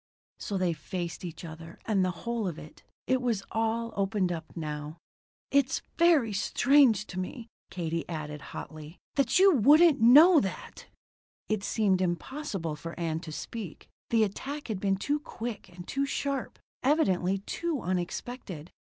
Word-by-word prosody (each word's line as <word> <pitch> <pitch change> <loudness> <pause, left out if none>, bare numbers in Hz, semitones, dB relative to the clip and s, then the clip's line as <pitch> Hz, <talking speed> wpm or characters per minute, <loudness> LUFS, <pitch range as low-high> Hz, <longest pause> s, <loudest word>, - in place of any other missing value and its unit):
So 200 - -3
they 180 -2 +1
faced 170 +3 -5
each 170 -1 -7
other 165 +1 -10
and 200 -4 +2
the 185 - +1 0.2
whole 235 -3 -1
of 170 -4 -4
it. 155 - -12 0.2
It 260 0 +1
was 230 -6 0
all 225 +1 -1
opened 195 -2 0
up 165 -2 -4
now. 150 0 -5 0.5
"It's 280 -2 +2 0.2
very 315 -11 +4
strange 240 +1 +4
to 185 - -6
me," 230 +5 -6 0.2
Katie 165 -2 -3
added 150 -3 -5
hotly, 155 +3 -9 0.2
"that 275 0 +2
you 385 0 +7
wouldn't 290 +4 +6
know 300 +9 +8
that." 190 -6 -5 0.6
It 215 -2 0
seemed 200 -5 +1
impossible 185 - -3
for 165 +3 -8
Ann 160 -2 -1
to 165 -2 -8
speak; 195 +2 -7 0.2
the 225 -1 +4
attack 275 +8 -4
had 210 -4 -2
been 195 0 +1
too 290 +9 0
quick 240 - -6
and 175 0 -11
too 275 0 -1
sharp; 275 -2 -3 0.2
evidently, 195 - +2
too 305 - -3
unexpected. 180 - -4
200 Hz, 150 wpm, -29 LUFS, 175-260 Hz, 0.6 s, know